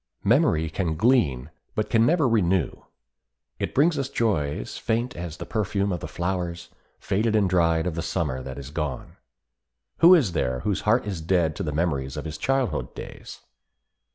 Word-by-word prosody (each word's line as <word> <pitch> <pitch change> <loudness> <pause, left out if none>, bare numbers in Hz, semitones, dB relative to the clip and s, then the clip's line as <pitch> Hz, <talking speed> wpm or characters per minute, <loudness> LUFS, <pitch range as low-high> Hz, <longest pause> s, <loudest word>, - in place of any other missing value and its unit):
Memory 80 +1 +3
can 80 -1 -1
glean, 80 - +2 0.2
but 110 - -2
can 115 0 +4
never 160 -3 +3
renew. 95 - +2 0.9
It - - -3
brings 150 +3 +3
us 135 -1 -2
joys 75 - -1
faint 120 +2 -1
as 85 -2 -6
the - - -6
perfume 100 -2 -1
of 90 - -2
the 75 - -6
flowers, 85 +1 -3 0.3
faded 110 +3 0
and 105 -3 +3
dried 85 -2 +2
of 90 - -1
the 85 - -3
Summer 75 -6 -2
that 65 +1 -7
is 70 0 -8
gone. 75 -5 -4 0.8
Who 175 +2 +9
is 130 - +2
there 65 -6 -1
whose 105 -3 -1
heart 120 +1 +3
is 95 -5 -4
dead 80 -2 +1
to - - -4
the 80 -5 -2
memories 70 -3 -1
of 75 - -5
his 80 0 -6
childhood 135 +4 -1
days? - - -9
90 Hz, 175 wpm, -25 LUFS, 80-110 Hz, 0.9 s, Who